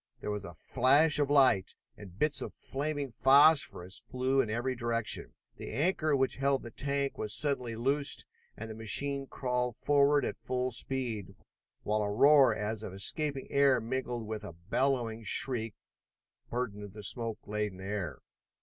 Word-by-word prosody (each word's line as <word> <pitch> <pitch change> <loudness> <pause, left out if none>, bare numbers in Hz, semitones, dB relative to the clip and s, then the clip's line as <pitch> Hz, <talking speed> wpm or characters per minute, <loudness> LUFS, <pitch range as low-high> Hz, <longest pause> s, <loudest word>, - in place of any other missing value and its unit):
There 105 - -4
was 105 -1 -4
a 85 - -10
flash 145 - +3
of 145 -1 +1
light, 135 -10 +4 0.2
and 95 -3 -13
bits 150 +3 +2
of - - -6
flaming 145 -1 -4
phosphorus 135 - +4
flew 130 +1 +1
in 120 - -3
every 120 +4 -1
direction. 115 -2 -1 0.2
The - - -7
anchor 155 - +1
which 135 -1 +1
held 135 0 +1
the 120 - -9
tank 140 +1 -2
was 105 -1 -1
suddenly 125 -6 -1
loosed 140 +5 0 0.3
and 115 - -6
the 110 - -7
machine 135 +6 0
crawled 125 -3 -2
forward 145 +1 +3
at - - -4
full 130 0 -2
speed, 120 -5 -3 0.5
while 105 +1 0
a 105 - -1
roar 140 +6 +6
as 105 0 -3
of 100 - -7
escaping 140 - 0
air 140 -3 +4
mingled 120 0 -3
with 110 0 -5
a 100 - -8
bellowing 115 +5 -1
shriek 115 -2 -1 0.7
burdened 105 -5 -4
the 105 -1 -9
smoke 115 -2 -2
laden 105 -2 -3
air. 95 -6 -5
125 Hz, 160 wpm, -31 LUFS, 105-140 Hz, 0.7 s, roar